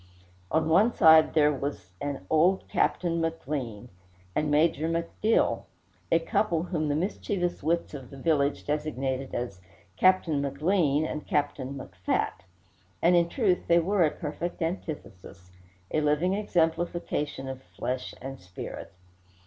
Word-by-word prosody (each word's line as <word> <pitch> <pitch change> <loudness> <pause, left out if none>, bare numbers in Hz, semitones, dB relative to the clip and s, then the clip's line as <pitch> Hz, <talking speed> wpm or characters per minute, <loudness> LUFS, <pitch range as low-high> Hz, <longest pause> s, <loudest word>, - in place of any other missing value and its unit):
On 160 +1 +1
one 195 +9 +5
side 160 0 +6
there 150 -1 +5
was 130 -10 -5
an 140 -8 -4
old 175 - +3
Captain 170 -2 +1
McLean, 135 -9 -3 0.5
and 150 0 +1
Major 155 +1 +2
McDill, 170 +7 +1 0.5
a - - +6
couple 170 0 0
whom 165 -4 -2
the 145 - +1
mischievous 175 +1 -2
wits 165 +3 0
of 135 -4 -8
the 135 - -11
village 140 -1 +1
designated 135 -3 -2
as 100 -7 -4 0.4
Captain 180 -6 +3
McLean 150 +1 +1
and 150 -1 -5
Captain 145 -2 -1
McFat; 95 -9 -2 0.7
and, 175 +2 +4
in 170 -1 +3
truth, 195 -6 +1
they 170 - +5
were 185 +3 +2
a 155 - +4
perfect 170 +4 -5
antithesis, 100 - -6 0.4
a 155 - +1
living 150 +5 +2
exemplification 170 -7 -1
of 130 -1 -6
flesh 125 -1 -5
and 135 +1 -7
spirit. 90 0 -8
155 Hz, 135 wpm, -28 LUFS, 135-170 Hz, 0.7 s, side